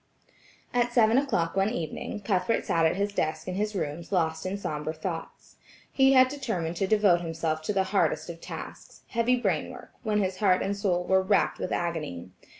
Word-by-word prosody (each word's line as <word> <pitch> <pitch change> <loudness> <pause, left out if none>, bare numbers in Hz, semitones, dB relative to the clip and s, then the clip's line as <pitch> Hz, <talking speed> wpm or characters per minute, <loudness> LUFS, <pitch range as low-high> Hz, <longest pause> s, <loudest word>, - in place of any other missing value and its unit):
At 245 0 +2
seven 235 0 +5
o'clock 205 -13 -1
one 195 +1 +2
evening, 210 +1 -4
Cuthbert 200 +2 0
sat 165 -1 +3
at 160 - 0
his 200 +1 -1
desk 155 -3 -2
in 185 - -2
his 210 +2 -2
rooms 165 0 -4
lost 160 -2 0
in 195 +2 -2
sombre 155 -4 -4
thoughts. 165 0 -7 0.3
He 270 0 +5
had 260 -1 +7
determined 205 - -3
to 195 - 0
devote 200 -4 +4
himself 160 -1 -2
to 185 +7 -2
the 195 -1 +2
hardest 200 - +1
of 170 -1 -8
tasks, - - -9
heavy 235 +1 +2
brain 195 -11 0
work, - - -11
when 215 -3 0
his 190 -2 -1
heart 190 -4 +3
and 200 - -1
soul 185 -3 0
were 190 +1 +3
racked 195 +1 +1
with - - -3
agony. 155 - -3
190 Hz, 190 wpm, -27 LUFS, 165-215 Hz, 0.3 s, had